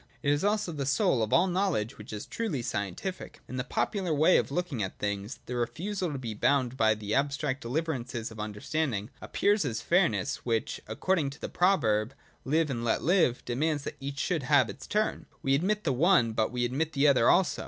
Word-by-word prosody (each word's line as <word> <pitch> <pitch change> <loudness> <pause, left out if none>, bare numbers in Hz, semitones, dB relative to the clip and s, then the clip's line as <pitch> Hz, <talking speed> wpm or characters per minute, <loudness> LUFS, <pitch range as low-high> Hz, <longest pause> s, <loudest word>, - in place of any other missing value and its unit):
It 145 - +3
is 145 - -1
also 205 -3 +1
the 140 -4 -3
soul 135 -3 +2
of 110 - -1
all 175 - +5
knowledge 180 - -1
which 105 - -9
is 105 -1 -5
truly 185 - -3
scientific. 105 - -4
In 130 - -6
the 125 - -1
popular 185 +5 -1
way 155 +4 +5
of - - 0
looking 175 -10 -2
at 95 - -4
things, 100 +3 -3
the 125 - -5
refusal 170 - -2
to 140 - -4
be 120 -4 -5
bound 130 +2 +1
by 110 -3 +3
the 105 0 -4
abstract 140 0 0
deliverances 125 -4 -3
of 110 - -11
under 105 -1 -5
standing 130 -9 -1
appears 205 -1 +1
as 115 -5 -2
fairness, 170 - +2
which, 115 -2 -2
according 150 - 0
to 140 - -11
the - - -5
proverb 130 - +2 0.3
Live 155 +1 +1
and 120 -2 -3
let 115 - 0
live, 165 -7 +2
demands 145 +4 0
that 145 - -6
each 140 0 -5
should 165 0 0
have 130 -4 +3
its - - -11
turn; 215 +1 -1 0.2
we 135 - +2
admit 205 +9 +1
the 140 - +1
one, 150 -4 +4
but 110 0 0
we 120 -1 0
admit 150 +6 -1
the 140 +1 +3
other 135 -5 +5
also. 190 - +3
135 Hz, 205 wpm, -29 LUFS, 115-165 Hz, 0.3 s, all